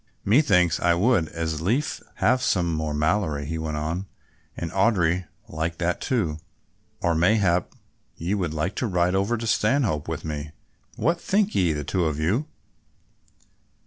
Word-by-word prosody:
"Methinks 100 - +4
I 85 -1 +3
would 95 -3 +2
as 80 -2 -3
lief 125 - 0
have 125 +2 +2
some 85 -8 +1
more 80 -1 -2
Malory," 75 -1 0
he 80 +2 -3
went 80 -1 -3
on, 80 +6 -3 0.5
"and 85 - -4
Audry 90 -3 +2 0.2
would - - -12
like 80 +1 -2
that 90 -1 -1
too, 100 - -1 0.6
or 85 - +3
mayhap 90 0 +2 0.5
ye 85 +4 -2
would 90 -6 -1
like 80 +5 -2
to 125 - 0
ride 90 -2 +1
over 100 +5 +1
to 115 - -5
Stanhope 105 - +1
with 80 -1 -4
me, 75 0 -5 0.4
what 150 +10 0
think 205 +1 +1
ye, 90 -3 +2
the 75 -1 -2
two 90 +4 0
of 80 -2 -1
you?" 105 - 0
85 Hz, 160 wpm, -25 LUFS, 80-105 Hz, 0.6 s, Methinks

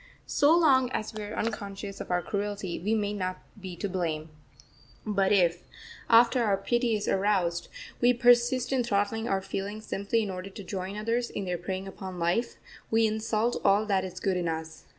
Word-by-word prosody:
So 300 +4 +4
long 265 -7 +4
as 215 - -3
we 215 - -5
are 210 +1 -6
unconscious 200 -2 -4
of - - -7
our 180 -1 +1
cruelty 205 -3 -3
we 210 +6 0
may 205 -1 -1
not 185 -2 -4 0.2
be 185 -2 -6
to 200 - -3
blame. 165 -4 -3 0.7
But 200 -3 +1
if, 175 -3 +3 0.5
after 235 +2 +6
our 200 -3 +2
pity 240 +3 +1
is 210 0 -3
aroused, 190 -3 +1 0.3
we 245 0 +5
persist 245 +1 +3
in 255 -2 +2
throttling 220 +1 0
our 190 -1 0
feelings 205 +3 -5
simply 205 +3 0
in 200 - -3
order 185 +1 -6
to 200 +1 -9
join 190 +1 -5
others 230 +3 -1
in 200 - -4
their 180 -1 -2
preying 190 +2 -4
upon 190 -1 -7
life, 175 +8 0 0.3
we 225 0 +3
insult 220 +1 0
all 205 +2 +4
that 195 -3 +1
is 185 -1 -6
good 190 -1 0
in 175 -1 -1
us. 160 0 -5
205 Hz, 190 wpm, -28 LUFS, 185-225 Hz, 0.7 s, after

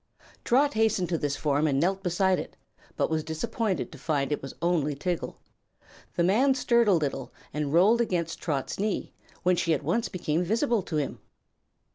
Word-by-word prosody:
Trot 280 +4 +3
hastened 215 -5 +1
to 170 - +1
this 145 -2 -1
form 150 +1 +1
and 135 -2 +1
knelt 190 +5 +1
beside 185 0 +2
it, - - -8 0.4
but - - +2
was 160 -1 0
disappointed 185 +6 -2
to 150 - -11
find 140 -2 -1
it 150 - -1
was 135 - -8
only 160 -4 +1
Tiggle. 175 +4 -3 0.8
The 170 - +2
man 250 +10 +4
stirred 235 -3 +3
a 200 - +5
little 140 -6 -1 0.2
and 150 -2 -2
rolled 200 +9 +5
against 170 -7 -1
Trot's 145 -1 -2
knee, 210 0 -2 0.3
when 180 0 +4
she 170 -2 +1
at 145 - -5
once 185 +11 0
became 170 -2 -1
visible 230 - +1
to 170 - -6
him. 145 -3 -2
175 Hz, 180 wpm, -27 LUFS, 150-205 Hz, 0.8 s, a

